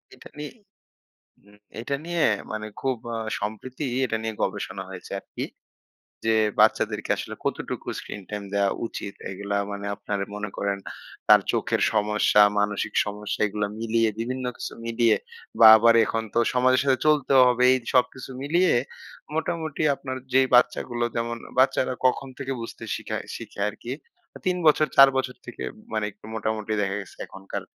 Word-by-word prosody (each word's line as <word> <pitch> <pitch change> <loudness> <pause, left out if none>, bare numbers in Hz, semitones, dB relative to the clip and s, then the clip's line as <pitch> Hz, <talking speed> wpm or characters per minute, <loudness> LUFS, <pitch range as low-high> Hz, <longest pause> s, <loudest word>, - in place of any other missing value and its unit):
এটা - - -14
নিয়ে 150 0 -6 1.0
উম 105 0 -20 0.2
এটা 140 +4 -3
নিয়ে 175 -1 -2 0.3
মানে 110 0 -4
খুব 130 -2 0 0.2
আ - - -3 0.2
সম্প্রীতি 125 +7 -5 0.2
এটা 115 -2 -1
নিয়ে 110 -1 -3
গবেষণা - - -3
হয়েছে - - -9
আরকি। - - -6 0.8
যে 110 0 +3 0.2
বাচ্চাদেরকে - - +2
আসলে - - -6
কতটুকু - - -3
স্ক্রিন-টাইম 105 +1 -7
দেওয়া 100 -1 +2 0.2
উচিত? 100 - -6 0.2
এইগুলা 100 +1 -4 0.2
মানে 100 0 -5
আপনার 100 0 -4 0.2
মনে 105 -1 -4
করেন 100 -1 -1 0.5
তার - - +8
চোখের - - 0
সমস্যা, 105 0 +3 0.2
মানসিক 105 0 -1
সমস্যা 105 0 -4
এগুলা 105 0 -2
মিলিয়ে 115 0 +2
বিভিন্ন 130 +2 -3
কিছু - - -5
মিলিয়ে 115 0 +3 0.4
বা 110 - +10
আবার 115 +1 +5
এখন 115 0 -2
তো 115 - +3
সমাজের 130 +1 +4
সাথে 130 -2 +2
চলতেও 140 -3 +5
হবে। 125 0 +2
এই - - +3
যে - - -16
সবকিছু 130 +1 +1
মিলিয়ে 170 +6 +3 0.6
মোটামুটি 160 -2 -2
আপনার 130 -1 -5 0.2
যেই 130 0 +5
বাচ্চাগুলো 120 -1 +2
যেমন, 115 0 -2 0.2
বাচ্চারা 130 -1 +3
কখন 135 +1 +2
থেকে 135 -1 -4
বুঝতে 115 0 -8
শিখায় - - -5
শিখে - - -9
আরকি? 115 +4 -6 0.4
আ - - -7
৩ 180 -1 +1
বছর, 155 0 +5
৪ 135 0 +10
বছর 130 -1 -2
থেকে - - -7 0.3
মানে 110 -1 0
একটু - - -18
মোটামুটি 110 -1 -2
দেখা 100 0 -1
গেছে 95 - -14
এখনকার 95 0 -7
115 Hz, 155 wpm, -25 LUFS, 105-130 Hz, 1.0 s, বা